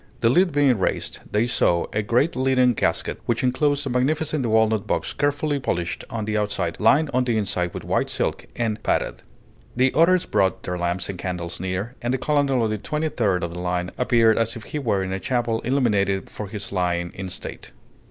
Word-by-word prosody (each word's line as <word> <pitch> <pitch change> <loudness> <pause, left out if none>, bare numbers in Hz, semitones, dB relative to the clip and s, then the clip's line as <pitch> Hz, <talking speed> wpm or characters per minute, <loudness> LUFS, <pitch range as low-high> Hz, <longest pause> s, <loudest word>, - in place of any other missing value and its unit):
The 115 - +4
lid 180 +5 +4
being 140 -6 +3
raised, 95 - -1
they 105 +3 +2
saw 85 -7 +2
a 105 - +1
great 120 +9 +1
leaden 130 -1 +3
casket - - -1
which 120 +1 0
inclosed 145 +3 +1
a - - -2
magnificent 150 +3 0
walnut 110 -2 +2
box - - -1
carefully 145 0 0
polished 90 -9 -2
on 110 -2 -3
the 110 0 0
outside, 100 -5 -2
lined 140 +7 +4
on 130 +1 +3
the 120 -3 0
inside 90 -4 -1
with - - -5
white - - 0
silk, - - -2
and 110 -2 -1
padded. - - -1 0.5
The 130 +1 +3
others 175 +3 +4
brought 95 -1 +1
their 90 0 -3
lamps 85 +1 -1
and 95 -3 -6
candles 90 -2 -4
near, 95 +6 -3
and 120 +2 0
the - - 0
colonel 140 -3 +1
of 110 - 0
the 110 - -2
Twenty 155 +7 -2
third 100 - 0
of 85 -1 -3
the 90 - -5
line 90 0 -2
appeared 115 -3 +3
as 115 +2 0
if 115 - -8
he 150 - -4
were 105 -8 0
in 95 - -4
a 95 - -2
chapel 120 0 -1
illuminated 105 -7 +1
for 105 - -6
his 100 0 -6
lying 90 -2 -1
in 95 -1 -6
state. - - -7
115 Hz, 205 wpm, -23 LUFS, 95-130 Hz, 0.5 s, The